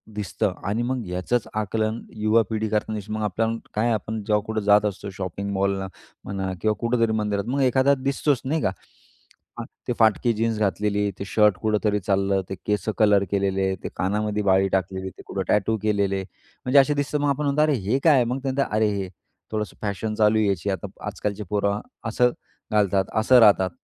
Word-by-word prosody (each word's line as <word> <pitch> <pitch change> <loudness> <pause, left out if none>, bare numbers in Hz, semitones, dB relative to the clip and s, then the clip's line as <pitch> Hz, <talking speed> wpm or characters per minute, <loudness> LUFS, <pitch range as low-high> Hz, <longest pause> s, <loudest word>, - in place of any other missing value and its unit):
दिसतं 105 -4 -1
आणि 110 +4 0
मग 125 -3 -2
याचंच 90 +7 -1
आकलन 110 +1 -1
युवा 110 +2 +3
पिढी 110 0 -1
करतेच 105 -1 -2
न - - -3
मग 110 0 -2
आपल्याला 115 +3 -1 0.2
काय 115 +3 +1
आपण 110 0 -3
जेव्हा 105 -1 +2
कुठे 110 -1 -2
जात 105 +1 +5
असतो 100 0 -3
शॉपिंग 100 +1 -5
मॉलला 95 0 0 0.4
म्हणा 95 -1 -3
किंवा 110 -1 +1
कुठेतरी 115 -1 +1
मंदिरात 105 -2 -1
मग 135 +2 0
एखादा 130 +2 +4
दिसतोच 135 0 0
नाही 155 +3 0
का? 95 - +1 1.2
ते 125 - +1
फाटकी 110 +2 +3
जीन्स 115 0 -1
घातलेली, 105 +1 0
ते 100 - -4
शर्ट 105 -1 +3
कुठेतरी 105 -1 +1
चाललं, 100 0 +1
ते 95 - -3
केसं 105 +1 0
कलर 105 -2 +5
केलेले, 95 -1 +1
ते - - -3
कानामध्ये 105 +2 -1
बाळी 95 0 +3
टाकलेली, 95 0 -2
ते - - -10
कुठं 95 - -3
टॅटू 110 +2 +2
केलेले, 100 -2 +1 0.4
म्हणजे 135 +2 +6
असे 150 +2 +4
दिसतं. 145 +1 -1
मग 145 - +2
आपण 140 +2 0
म्हणतो, 140 +2 +2
"अरे! 155 -1 +3
हे 130 +5 +2
काय?" 145 -7 +5
मग 125 +3 -2
ते - - -3
म्हणतात, 135 +1 0
"अरे, 110 0 +3
हे 95 -1 -3 0.4
थोडंसं 105 -1 -3
फॅशन 105 +1 -3
चालूय 105 0 +3
याची." 100 0 -1
आता 100 +1 -3 0.2
आजकालचे 105 +1 -3
पोरं 100 0 0 0.3
असं 125 +2 +3 0.4
घालतात, 100 -2 +2 0.2
असं 125 +2 +6
राहतात. 100 -4 +5
105 Hz, 185 wpm, -24 LUFS, 100-115 Hz, 1.2 s, म्हणजे